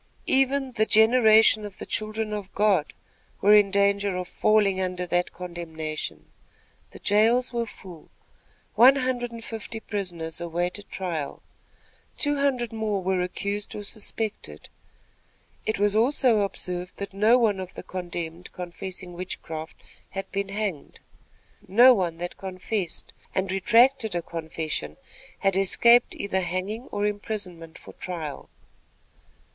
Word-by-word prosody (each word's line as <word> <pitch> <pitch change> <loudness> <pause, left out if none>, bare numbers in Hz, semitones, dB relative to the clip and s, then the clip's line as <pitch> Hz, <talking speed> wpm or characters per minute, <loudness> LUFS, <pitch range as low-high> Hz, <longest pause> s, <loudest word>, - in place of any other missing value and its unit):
Even 270 0 +2
"the 215 -3 +1
generation 220 -1 +6
of 205 -2 -8
the - - -7
children 215 0 -2
of 205 -2 -5
God" 200 -7 +2 0.5
were 205 +1 +5
in 205 -1 +6
danger 200 0 +2
of 180 0 -3
"falling 200 -3 +2
under 180 -1 -2
that 175 0 0
condemnation." 160 -3 -6 0.6
The - - -12
jails 230 +5 +3
were 235 -1 -1
full. 180 -6 -12 0.6
One 260 +4 +7
hundred 255 -2 -1
and 230 -1 -8
fifty 225 0 -6
prisoners 175 -7 -4
awaited 175 +4 -3
trial, 170 -6 -4 0.7
two 290 -1 +2
hundred 255 -5 0
more 215 -3 -1
were 185 0 +1
accused 200 +3 -3
or 210 - -5
suspected. 205 - -4 1.0
It 220 - 0
was 205 +1 +2
also 245 0 +3
observed 180 -3 -3
that 200 -1 -6
no 215 +5 +5
one 215 -5 +2
of 185 -1 -7
the - - -7
condemned 175 -1 -6
confessing 180 0 -6
witchcraft 165 -3 -6 0.3
had 195 0 -6
been 200 0 -2
hanged. 200 -7 -4 0.7
No 240 +7 +8
one 175 -7 -1
that 175 +1 -6
confessed, 190 -1 -4 0.2
and 190 0 0
retracted 230 +2 +3
a 170 - -1
confession, 160 -1 -4 0.5
had 195 -1 +3
escaped 235 +5 +4
either 190 -1 -1
hanging 185 +7 -3
or 205 0 -2
imprisonment 200 -6 -4
for - - -13
trial. 165 -6 -6
200 Hz, 130 wpm, -26 LUFS, 180-220 Hz, 1.0 s, No